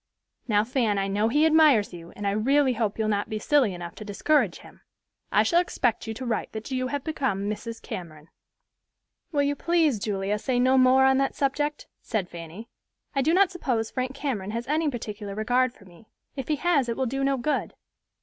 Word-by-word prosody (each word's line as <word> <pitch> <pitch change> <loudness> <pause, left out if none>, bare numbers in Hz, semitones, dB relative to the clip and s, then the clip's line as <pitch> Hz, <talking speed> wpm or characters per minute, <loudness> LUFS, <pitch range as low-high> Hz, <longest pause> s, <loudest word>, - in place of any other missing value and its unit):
Now, 210 -3 +3
Fan, 225 -3 0
I 195 0 0
know 205 +3 +1
he 295 +6 +3
admires 305 - +5
you, 170 -1 -10
and 205 - -6
I 200 - +2
really 260 +6 +2
hope 220 -3 -1
you'll 220 -1 0
not 205 -1 -1
be 215 - -2
silly 260 0 +2
enough 175 -1 -7
to - - -7
discourage 210 - +1
him. - - -16 0.5
I - - +4
shall 345 -1 +3
expect 245 -10 -1
you 220 - -4
to 260 - -6
write 230 -3 -2
that 220 +4 -7
you 255 0 -1
have 285 +1 -3
become 235 - -1
Mrs. 225 +2 -5
Cameron." 155 -3 -8 1.0
"Will 290 -3 +2
you 285 0 0
please, 320 -6 +2
Julia, 200 0 -2
say 250 +2 0
no 255 +1 +4
more 260 0 +5
on 265 0 +4
that 275 - 0
subject," 295 +2 -1 0.2
said 210 -6 -2
Fanny. 170 +6 -9 0.5
"I 275 - +1
do 300 +4 +2
not 375 +1 +4
suppose 245 -11 -2
Frank 255 0 -3
Cameron 250 -9 -3
has 230 +3 -3
any 310 +2 +1
particular 210 -5 -6
regard 245 +4 +1
for 205 - -20
me; 180 +4 -18 0.3
if 270 -3 -5
he 305 - +1
has 290 -5 +1
it 230 - -2
will 265 - 0
do 270 +3 -2
no 275 0 +2
good." 295 +5 -2
245 Hz, 205 wpm, -26 LUFS, 210-280 Hz, 1.0 s, admires